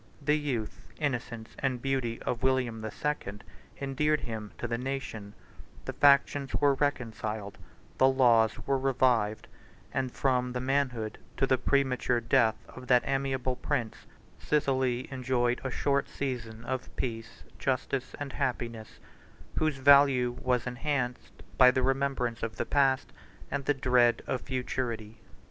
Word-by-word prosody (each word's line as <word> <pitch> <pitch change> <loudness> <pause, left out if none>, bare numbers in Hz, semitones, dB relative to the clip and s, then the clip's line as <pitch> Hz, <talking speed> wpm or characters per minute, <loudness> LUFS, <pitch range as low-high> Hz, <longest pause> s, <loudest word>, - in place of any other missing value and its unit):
The 150 0 +1
youth, 135 -8 -3
innocence, 120 -6 -3
and 130 -2 -1
beauty 130 -3 -1
of 120 - -2
William 130 -4 +1
the 110 - -4
Second, 105 -6 -4 0.3
128 - - -8
endeared 150 +3 +1
him 110 -3 -6
to 120 - -3
the 115 0 -2
nation: 125 -6 -5 0.5
the - - -4
factions 140 -1 +4
were 145 -1 +4
reconciled; 110 -7 -2 0.4
the 130 - +7
laws 120 -4 +3
were 135 -1 +1
revived; 125 -5 +1 0.5
and 130 -1 -1
from 125 -2 0
the 125 - -2
manhood 130 -4 -1 0.2
to 135 - +3
the 130 -1 +2
premature 130 -3 +1
death 115 -1 +3
of 130 0 -11
that 125 -2 +5
amiable 135 -2 -1
prince, 125 -4 -3 0.3
Sicily 130 -4 0
enjoyed 125 -2 0
a 130 - -2
short 140 +2 0
season 115 -4 -5
of 130 +1 -3
peace, 115 -2 -5 0.2
justice, 130 0 -2
and 145 -2 -5
happiness, 120 -5 -3 0.6
whose 155 -3 +1
value 135 -2 +6
was 125 -2 +1
enhanced 125 0 -3 0.2
by 125 -1 +9
the 130 0 +1
remembrance 135 -3 0
of 115 0 -3
the 120 - -2
past 135 -1 +2 0.4
and 140 - -2
the 145 - +3
dread 125 -2 +3
of 130 - -2
futurity. 120 -4 -4
130 Hz, 140 wpm, -29 LUFS, 120-135 Hz, 0.6 s, by